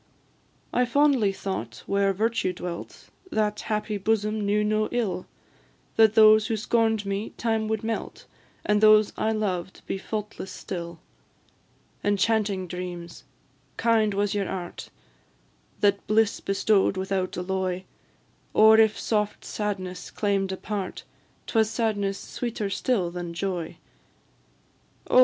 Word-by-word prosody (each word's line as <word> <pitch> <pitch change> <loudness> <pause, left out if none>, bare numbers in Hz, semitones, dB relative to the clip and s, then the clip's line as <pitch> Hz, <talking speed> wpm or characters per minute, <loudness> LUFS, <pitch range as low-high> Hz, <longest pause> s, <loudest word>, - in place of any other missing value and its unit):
I 250 - +3
fondly 260 -4 +3
thought 195 0 -5
where 200 0 +2
Virtue 220 -1 0
dwelt, 175 -1 -7 0.2
That 210 -1 0
happy 210 -1 -2
bosom 215 +1 0
knew 205 +1 +2
no 215 0 +1
ill 220 -7 -1 0.7
That 220 -1 +5
those 215 0 +7
who 225 -2 -1
scorn'd 220 -1 +1
me, 200 +2 -3
time 225 -2 0
would 220 0 -1
melt, 225 0 -4 0.4
And 210 0 +2
those 215 -1 +6
I 220 - 0
loved 190 -4 -3
be 195 - -3
faultless 210 -2 -5
still. 170 -2 -6 1.1
Enchanting 205 -1 +1
dreams! 175 -4 -7 0.5
kind 220 -3 +2
was 205 0 +1
your 200 -2 -1
art 180 -2 -6 0.9
That 200 -1 +2
bliss 215 0 +2
bestow'd 195 0 +2
without 190 -1 -2
alloy; 185 0 -2 0.7
Or 220 +1 +7
if 220 -1 +4
soft 210 -2 -1
sadness 185 -4 -4
claim'd 195 -2 0
a 190 - -3
part, 200 -3 -4 0.4
'Twas 220 -2 +2
sadness 215 -3 -1
sweeter 225 -4 -4
still 195 -7 0
than 175 -1 -6
joy. 175 -3 -3 1.3
Oh! - - +7
205 Hz, 125 wpm, -26 LUFS, 190-220 Hz, 1.3 s, those